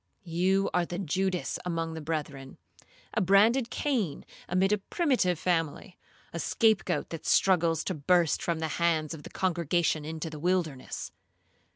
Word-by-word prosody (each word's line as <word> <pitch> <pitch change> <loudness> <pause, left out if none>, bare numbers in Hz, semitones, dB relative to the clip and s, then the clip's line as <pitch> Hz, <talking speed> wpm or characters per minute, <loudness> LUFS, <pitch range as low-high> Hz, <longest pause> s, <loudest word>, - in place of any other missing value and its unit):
You 185 +3 +1
are 180 - +2
the 175 0 -5
Judas 185 0 -1
among 165 -2 -2
the 160 - -6
brethren; 145 -4 -5 0.6
a - - +1
branded 220 +7 +4
Cain 225 - -1 0.2
amid 185 +2 +2
a 210 - +2
primitive 240 - +1
family; 170 +2 -2 0.3
a 170 - -3
scape 220 +3 +2
goat 180 - -2
that 165 -2 -6
struggles 170 -4 +3
to 185 - -2
burst 170 +1 +2
from 170 -1 -1
the 160 0 -2
hands 160 -3 +1
of 160 - -8
the - - -10
congregation 170 -3 0
into 160 +1 -5
the 155 - -7
wilderness. 170 -6 -2
175 Hz, 155 wpm, -29 LUFS, 160-190 Hz, 0.6 s, branded